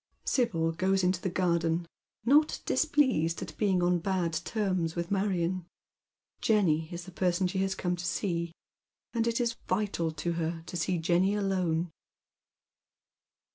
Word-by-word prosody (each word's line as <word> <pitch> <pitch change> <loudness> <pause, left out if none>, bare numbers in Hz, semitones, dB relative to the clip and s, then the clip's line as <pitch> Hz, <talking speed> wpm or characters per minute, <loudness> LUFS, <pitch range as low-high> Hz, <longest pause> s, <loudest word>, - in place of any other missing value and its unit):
Sibyl 165 -11 +1
goes 190 +3 +1
into 180 0 +1
tlie 190 - -2
garden, 170 -2 +1 0.4
not 295 +5 +4
displeased 260 - +2
at - - -9
being 190 -4 +2
on 175 0 +3
bad 180 -2 -1
terms 185 -2 -1
witli 170 +1 -3
Marion. 185 -3 0 0.7
Jenny 165 -8 +2
is 175 0 -6
the 185 - -10
person 180 +1 +1
she 190 +1 -1
has 190 0 0
come 180 -1 -1
to 175 0 -6
see, 170 0 -1 0.6
and 230 -1 +1
it 230 +1 +1
is 235 -2 0
vital 185 -4 0
to 170 +2 -2
her 165 0 -2
to - - -7
see 175 +2 0
Jenny 175 +4 +2
alone. 180 -4 0
180 Hz, 145 wpm, -30 LUFS, 170-195 Hz, 0.7 s, not